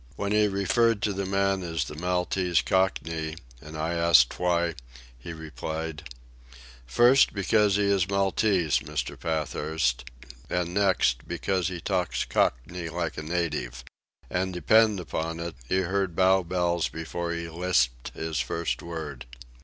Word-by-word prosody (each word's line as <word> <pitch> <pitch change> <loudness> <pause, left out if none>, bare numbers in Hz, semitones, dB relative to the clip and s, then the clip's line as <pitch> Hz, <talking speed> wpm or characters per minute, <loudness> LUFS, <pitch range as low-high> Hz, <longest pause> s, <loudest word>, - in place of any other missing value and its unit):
When 100 0 -3
he 105 0 +4
referred 105 +3 +1
to 105 - +1
the 95 0 -3
man 95 0 +1
as 85 -2 -2
the - - -8
Maltese 90 +1 0
Cockney, 80 -4 0 0.3
and 75 +1 -9
I 80 +2 -1
asked 85 -7 +4
why, 85 -1 +1 0.4
he - - -9
replied: 80 -1 -6 0.8
"First, 120 - +5
because 100 +1 +3
he 105 - +2
is 100 -2 +2
Maltese, 95 -3 +2
Mr. 75 -3 -4
Pathurst; 75 -5 -1 0.4
and 90 -1 -1
next, 95 -11 +2
because 95 -3 -1
he 90 -2 -4
talks 90 -1 -1
Cockney 85 +8 -1
like 85 0 -3
a - - -5
native. 75 -7 -3 0.4
And 95 +1 -1
depend 110 +3 +4
upon 80 -1 -4
it, 85 0 -4 0.2
he 95 - +2
heard 95 -1 -1
Bow 95 +1 +4
Bells 85 -2 0
before 85 +1 -4
he 85 0 -4
lisped 80 -8 0
his 80 -1 -3
first 85 0 -2
word." 80 -7 -7
85 Hz, 140 wpm, -27 LUFS, 80-95 Hz, 0.8 s, First